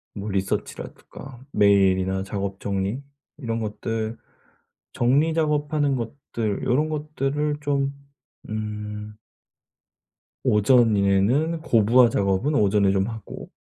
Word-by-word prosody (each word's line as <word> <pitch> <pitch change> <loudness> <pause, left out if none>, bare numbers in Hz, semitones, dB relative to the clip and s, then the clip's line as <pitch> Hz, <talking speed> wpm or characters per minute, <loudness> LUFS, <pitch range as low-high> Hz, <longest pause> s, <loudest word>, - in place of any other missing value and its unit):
뭐 105 0 -5
리서치라든가 110 +6 -5
메일이나 95 -2 +3
작업 100 0 -4
정리 100 +5 -2 0.4
이런 115 -6 -3
것들 110 +1 -3 0.8
정리 140 +7 +2
작업하는 150 -3 0
것들 115 -3 -4
요런 145 +6 +1
것들을 150 -1 -2
좀 140 -1 0 0.6
음 105 -1 -5 1.3
오전에는 110 +7 +3
고부화 120 -3 +4
작업은 100 +7 0
오전에 100 -4 +3
좀 95 0 +1
하고 110 -2 -8
115 Hz, 220 characters per minute, -24 LUFS, 100-140 Hz, 1.3 s, 고부화